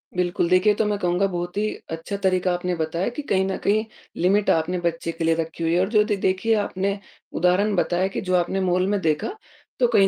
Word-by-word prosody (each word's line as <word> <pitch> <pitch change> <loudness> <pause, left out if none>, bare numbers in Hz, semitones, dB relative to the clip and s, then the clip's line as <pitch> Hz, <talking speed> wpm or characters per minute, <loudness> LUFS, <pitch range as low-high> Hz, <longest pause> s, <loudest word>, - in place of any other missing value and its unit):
बिल्कुल, 175 -1 0
देखिए 185 +3 +4
तो 220 - +1
मैं 210 0 0
कहूँगा 180 +1 +1
बहुत 175 0 -4
ही 210 +1 +1 0.2
अच्छा 165 +5 -4
तरीका 185 -1 +2
आपने 180 0 -2
बताया 165 +4 -1
कि 295 - -3
कहीं 190 -1 +2
न 190 - -2
कहीं 215 +2 +2 0.4
लिमिट 200 +3 +3
आपने 165 +3 +1
बच्चे 170 -1 -2
के 165 0 -5
लिए 165 0 +3
रखी 165 0 -4
हुई 165 0 +1
है 175 - +3
और 190 +1 +1
जो 215 -1 +4
दे 210 -1 0
देखिए 190 +4 +1
आपने, 200 -1 -1 0.3
उदाहरण 190 +4 +2
बताया 180 +1 +1
कि 195 - -4
जो 185 -1 0
आपने 180 +2 +1
मॉल 185 0 +1
में 205 0 +1
देखा, 160 - -1 0.4
तो 245 - +4
कहीं 210 -5 +4
185 Hz, 225 wpm, -23 LUFS, 175-200 Hz, 0.4 s, देखिए